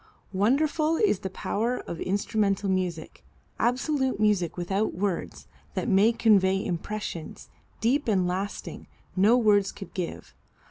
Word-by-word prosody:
Wonderful 295 - +2
is 405 - +2
the 190 - -4
power 230 +6 -2
of 170 - -7
instrumental 200 0 0
music, 180 -4 -2 0.4
absolute 260 +1 0
music 205 -6 +1
without 190 +4 -1
words, 190 -1 -3 0.3
that - - -2
may 205 +1 +5
convey 200 -4 +3
impressions, 180 -2 -5 0.3
deep 255 +6 +1
and 190 -5 +2
lasting, 190 +3 -4 0.3
no 210 +6 +5
words 205 -4 +3
could 195 - -10
give. 180 -3 -5
205 Hz, 125 wpm, -27 LUFS, 185-230 Hz, 0.4 s, may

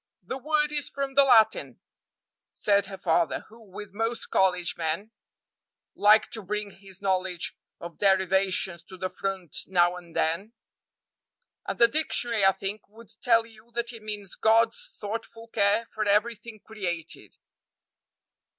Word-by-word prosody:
"The 260 - -5
word 300 +1 +1
is 295 -1 -2
from 275 -1 -3
the 280 +1 +6
Latin," 225 -5 +4 0.7
said 200 -1 +2
her 195 -1 -8
father, 170 -2 +1
who, 225 +2 -16
with 205 -1 -10
most 225 +3 -2
college 180 -2 +2
men, 165 +7 -3 0.8
liked 210 +1 +4
to 220 - 0
bring 210 +1 -3
his 195 0 -14
knowledge 185 -2 -1 0.2
of 170 0 -9
derivations 190 -2 +2
to 185 - -12
the 185 +1 -3
front 190 -5 -4
now 175 -1 +3
and 170 -2 -13
then, 180 +8 -1 1.1
"and - - -3
the 235 - +7
dictionary, 240 -6 0
I 195 - +7
think, 200 +2 -6
would 225 +1 -15
tell 230 -2 +4
you 225 0 -18
that 235 0 -2
it 225 - -10
means 210 -2 -6
God's 225 +1 +2
thoughtful 225 +2 -6
care 205 +1 +2
for 215 - -1
everything 215 +1 0
created." 175 -7 -5
205 Hz, 140 wpm, -27 LUFS, 190-230 Hz, 1.1 s, the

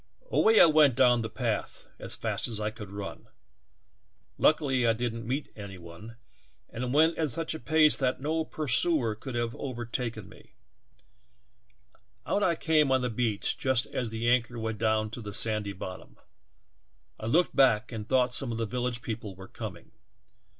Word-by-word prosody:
Away 225 - +4
T - - +9
went 155 -5 +5
down 125 -2 +4
the 110 - -4
path - - -3
as - - -6
fast - - -2
as 110 -3 -3
I 105 0 -2
could 105 -3 -10
run 100 0 -8 1.1
meet 125 -3 +1
any 100 -3 -8
one, 85 +6 -11 0.6
and 125 +1 -4
went 160 +4 +3
that 155 -2 +2
no 160 +4 -1
pursuer 150 -4 +1
could 120 +1 -5
taken 115 -6 -3
me. 95 - -18 1.7
Out 205 - 0
I 175 -4 +2
came 135 -8 +2
beach 110 -4 0
just 130 -3 +2
as 120 -3 -3
the 115 +1 -3
anchor 120 0 +2
went 110 -2 -4
down 110 -1 +1
to 120 - -7
the 105 -2 -5
sandy 105 -3 +2
bottom; 95 0 -9 1.0
I 110 - -5
looked 170 +9 +2
back 125 -4 +3
and 110 -2 -6
thought 130 -1 +2
some 130 -1 -2
of 115 - -3
the 115 - -1
village 120 +1 -3
people 110 -4 -5
were 95 +1 -11
coming. - - -8
120 Hz, 145 wpm, -28 LUFS, 110-135 Hz, 1.7 s, T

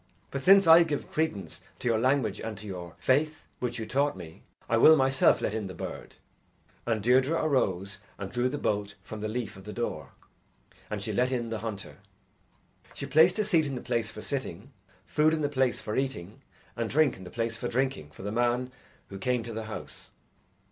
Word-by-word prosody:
But 140 - -3
since 195 +1 +7
I 165 +1 +9
give 150 -4 -4
credence 155 -11 -2 0.2
to - - -4
your 115 -2 +2
language 130 +1 +1
and 110 -2 -5
to 105 - -10
your 90 -4 -7
faith, 150 +3 +1 0.2
which 120 -1 -2
you 110 - -4
taught 140 +1 0
me, 80 -3 -10 0.3
I 115 - +2
will 155 +7 +8
myself 135 -2 +3
let - - -1
in 110 -3 -3
the 95 - -8
bird." - - -7 0.7
And 110 -3 0
Deirdre 130 +6 +4
arose 100 - 0 0.2
and 100 -1 -6
drew 120 +1 +1
the 145 - -3
bolt 100 -5 -1
from 110 -1 -8
the 110 - -2
leaf 110 -2 -4
of 95 - -12
the 105 - -7
door, 80 - -4 0.8
and - - -4
she - - -3
let 125 +1 +1
in 120 -3 -2
the 110 - -2
hunter. 105 -3 -6 1.0
She - - -4
placed 160 +6 +5
a 215 - +2
seat 170 -7 +2
in 135 - -4
the - - -3
place 115 -3 -1
for 105 - -9
sitting, 130 -2 -5 0.3
food 155 +1 +3
in 155 - -3
the 145 - +1
place 130 -3 +1
for 105 - -4
eating, 130 -4 -3 0.3
and 115 -2 -2
drink 155 -2 +3
in 95 - -12
the 90 - -9
place 115 +1 -2
for 120 +2 -4
drinking 130 - -1
for 80 - -12
the 105 - -3
man 120 +2 0 0.4
who 95 - -8
came 125 +2 0
to 115 0 -7
the 110 0 -4
house. 110 - -8
120 Hz, 210 wpm, -28 LUFS, 105-135 Hz, 1.0 s, I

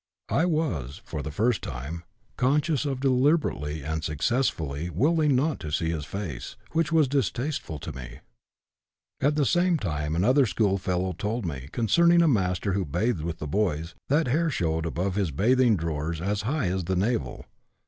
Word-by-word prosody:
I 165 - +2
was, 120 - -1
for 75 - -4
the 75 - -5
first 110 - +1
time, 75 +8 -6 0.3
conscious 150 +3 +1
of 135 -2 -2
deliberately 130 - +1
(and 80 +1 -3
successfully) 80 - -1
willing 150 - +2
not 145 +4 +1
to 75 - -6
see 80 +2 0
his 75 -3 -3
face, 85 -10 -6 0.2
which 165 -1 +1
was 160 -3 +4
distasteful 130 - -1
to 75 - -6
me. 60 -3 -9 1.0
At 145 +2 +3
the 150 -2 +2
same 175 +3 +3
time 75 - -2
another 130 - +4
schoolfellow 95 -4 0
told 105 +5 -3
me, 70 -4 -5
concerning 170 - +4
a - - +4
master 95 - +1
who 100 0 0
bathed 90 - -1
with 85 +1 -4
the 75 - -5
boys, 85 -2 -1 0.2
that 150 +4 +3
hair 160 +6 +2
showed 80 - -1
above 90 +4 -1
his 100 -3 0
bathing 115 - +3
drawers 80 0 -3
as 100 +4 -1
high 140 - 0
as 90 -1 -2
the 95 +2 0
navel. 110 +6 -1
100 Hz, 170 wpm, -26 LUFS, -, 1.0 s, was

